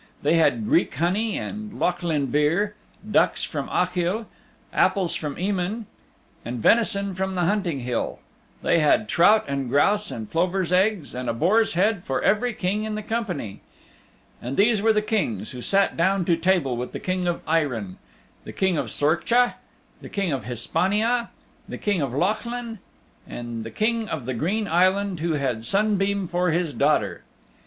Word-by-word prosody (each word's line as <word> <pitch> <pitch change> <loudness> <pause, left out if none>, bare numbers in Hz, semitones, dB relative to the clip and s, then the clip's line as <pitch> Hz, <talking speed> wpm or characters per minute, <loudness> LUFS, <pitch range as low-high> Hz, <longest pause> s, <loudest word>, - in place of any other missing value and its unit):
They 145 - +3
had 125 -9 +3
Greek - - +2
honey 190 - 0
and 215 0 -6
Lochlinn 165 -7 0
beer; 165 +8 +2 0.4
ducks - - +3
from - - -4
Achill, 180 +4 0 0.5
apples 190 -4 +2
from 150 -3 -3
Emain 195 +4 -2 0.6
and 120 +2 -5
venison 200 - +2
from 190 +1 -2
the 180 - 0
Hunting 175 -6 0
Hill; 120 -1 -2 0.5
they - - +3
had 160 +8 +3
trout 210 +6 +4
and 140 -2 -2
grouse 205 +10 +2
and 110 -2 -6
plovers' 180 - 0
eggs 185 -3 +1
and 125 0 -4
a - - -1
boar's 210 - +2
head 200 +1 +1
for 135 - -1
every 215 +5 +2
King 205 0 -2
in 215 -1 -3
the 215 - -4
company. 200 - -4 0.8
And 125 +3 -5
these 215 0 +4
were 225 +1 +4
the 210 -1 +1
Kings 115 - -1
who 125 - -7
sat 195 +8 +2
down 185 +2 +1
to 170 - +3
table 165 -6 +1
with 125 +1 -5
the - - -4
King 185 -1 -2
of 175 - -2
Eirinn: 125 - -1 0.5
the - - -9
King 190 -5 +1
of - - -3
Sorcha, 230 +12 +2 0.5
the - - -9
King 195 -4 -1
of 130 -6 -3
Hispania, 210 - 0 0.4
the - - -5
King 200 -5 0
of 135 -3 -1
Lochlinn 225 - -2 0.5
and 120 -1 -6
the 115 - -6
King 220 - -1
of 145 -7 -4
the 130 - -2
Green 195 - -1
Island 185 +2 +2
who 165 +1 0
had 130 -6 -1
Sunbeam 200 - +1
for 180 +1 0
his 165 -2 0
daughter. 150 +2 +1
180 Hz, 165 wpm, -24 LUFS, 145-210 Hz, 0.8 s, trout